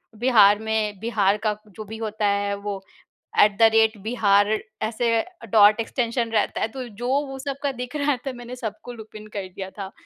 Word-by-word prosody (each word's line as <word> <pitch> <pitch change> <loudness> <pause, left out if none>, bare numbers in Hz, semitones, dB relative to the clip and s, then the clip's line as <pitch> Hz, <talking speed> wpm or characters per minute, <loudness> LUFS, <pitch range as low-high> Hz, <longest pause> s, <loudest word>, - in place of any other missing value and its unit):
बिहार 215 -3 +5
में 220 -2 -1
बिहार 210 -2 +1
का 210 -1 +1
जो 210 +1 -9
भी 220 +2 -8
होता 220 -1 -3
है 200 0 0
वो 200 -1 -5 0.6
एट 205 -1 +5
द 230 - +3
रेट 220 0 +4
बिहार 205 -3 +3 0.4
ऐसे 230 +2 0 0.4
डॉट 210 0 +6
एक्सटेंशन 235 0 -1
रहता 215 -2 0
है - - +2
तो 250 +2 -7
जो 230 +3 -6 0.2
वो 270 -1 -7
सब 275 0 -4
का 285 - +1
दिख 250 +1 -7
रहा 290 -1 +1
था 270 - -2
मैंने 245 0 -8
सबको 220 0 -6
लूप 220 -2 -12
इन 215 0 -9
कर 195 -2 -4
दिया 190 +1 -7
था। 195 -1 -7
220 Hz, 195 wpm, -23 LUFS, 205-240 Hz, 0.6 s, डॉट